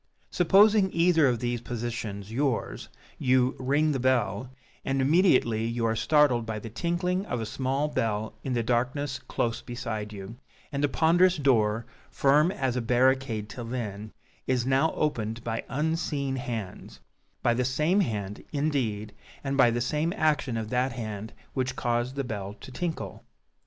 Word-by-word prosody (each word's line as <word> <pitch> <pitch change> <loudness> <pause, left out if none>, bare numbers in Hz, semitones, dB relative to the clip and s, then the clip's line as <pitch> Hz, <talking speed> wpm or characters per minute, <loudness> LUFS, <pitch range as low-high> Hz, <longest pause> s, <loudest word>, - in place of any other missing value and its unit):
Supposing 195 +3 +5
either 165 -3 +4
of 125 -2 +2
these 120 0 -2
positions 115 -4 -5
yours, 135 0 -1 0.3
you 130 0 +3
"ring 145 +4 +2
the 135 - -1
bell," 125 -2 +1 0.3
and 135 0 0
immediately 130 - +3
you 115 0 -1
are 115 0 +1
startled 145 -2 +3
by 110 -1 -4
the 110 +1 -7
tinkling 180 - -1
of 125 - -2
a 110 - -3
small 135 +5 -1
bell 110 -7 -1
in 130 - -2
the 120 -1 0
darkness 130 +4 -1
close 115 -1 -2
beside 115 -4 -5
you, 100 +3 -8 0.3
and 140 0 -2
the 145 - +3
ponderous 175 +5 +4
door, 115 -6 +2 0.2
firm 145 +4 +3
as 130 -9 -1
a 125 - 0
barricade 125 -2 +2
till 120 +2 -7
then, 110 -3 -5 0.4
is 125 -2 +1
now 135 +5 +3
opened 115 -6 -2
by 115 -1 -3
unseen 145 -2 -1
hands 115 -7 -6 0.4
by 120 - +4
the 125 +2 0
same 150 +9 +2
hand, 105 - -2
indeed, 125 -9 -1 0.3
and 135 0 -1
by 130 -3 +6
the 120 +1 -1
same 150 +7 0
action 145 - +1
of 110 -1 -4
that 125 0 +1
hand 110 -2 -5 0.2
which 130 -1 -1
caused 120 +2 -1
the 140 - -1
bell 105 -4 -5
to - - -10
tinkle. 165 +6 -4
125 Hz, 160 wpm, -27 LUFS, 115-145 Hz, 0.4 s, by